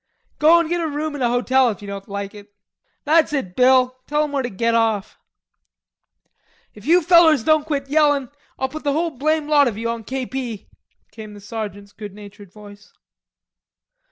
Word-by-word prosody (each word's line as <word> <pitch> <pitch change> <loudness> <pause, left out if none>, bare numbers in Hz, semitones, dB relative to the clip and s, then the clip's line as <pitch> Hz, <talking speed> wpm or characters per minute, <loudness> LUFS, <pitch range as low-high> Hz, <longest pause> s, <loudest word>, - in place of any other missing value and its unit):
"Go 315 +3 +6
an' 335 - -1
get 345 +1 -1
a 325 - -1
room 300 +1 -4
in 290 - -6
a 240 - +2
hotel 250 +1 +2
if 210 - -5
you - - -8
don't 200 0 -8
like 200 0 -5
it." 205 0 -14 0.5
"That's 310 0 +3
it, 190 -11 -3
Bill, 255 0 +3
tell 300 +1 +1
him 300 - -4
where 280 -1 -1
to 245 - -4
get 230 +3 -1
off." 225 -3 0 1.5
"If 210 +3 -14
you 350 +2 +4
fellers 325 -6 +5
don't 310 +1 +2
quit 280 -3 -2
yellin', 290 -3 +2 0.3
I'll 265 - -1
put 310 +3 -8
the 285 -1 0
whole 330 +2 -1
blame 305 +3 -1
lot 290 -2 +4
of 220 -4 -3
you 230 +1 -3
on 230 -1 -6
K. 260 +4 -4
P.," 245 -6 -6 0.4
came 215 -1 -11
the - - -11
sergeant's 205 -1 -7
good 205 -3 -10
natured 205 -2 -13
voice. 205 0 -15
255 Hz, 190 wpm, -20 LUFS, 210-300 Hz, 1.5 s, Go